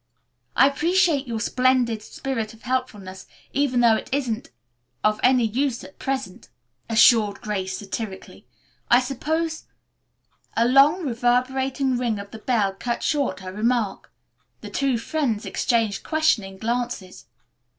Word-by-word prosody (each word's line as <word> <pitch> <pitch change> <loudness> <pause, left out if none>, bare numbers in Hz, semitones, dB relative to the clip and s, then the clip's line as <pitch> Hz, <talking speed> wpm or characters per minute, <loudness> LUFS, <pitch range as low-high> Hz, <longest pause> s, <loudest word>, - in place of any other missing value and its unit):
"I 270 - +6
appreciate 330 -1 +2
your 230 -2 -3
splendid 250 -2 +1
spirit 225 -2 -4
of 225 - -22
helpfulness 215 -7 -4 0.3
even 265 -3 +1
though 230 -2 +5
it - - -5
isn't 255 -5 -2 0.5
of 215 0 +2
any 250 -2 +4
use 245 +3 -1
at 285 - -14
present," 265 -8 -4 0.4
assured 220 -2 +5
Grace 190 -3 -3
satirically. 200 -1 -7 0.4
"I 240 - +7
suppose 315 +5 -2 0.5
" - - -25
A 230 +1 +4
long 285 +8 +5
reverberating 255 +1 0
ring 235 -4 0
of 200 0 -8
the 220 - -9
bell 215 -5 +1
cut 235 +5 -3
short 275 -11 0
her 185 0 -7
remark. 220 -1 -1 0.5
The - - -9
two 270 -3 +1
friends 235 -3 -2
exchanged 225 -5 0
questioning 245 -12 0
glances. 235 -4 -4
240 Hz, 130 wpm, -23 LUFS, 215-270 Hz, 0.5 s, I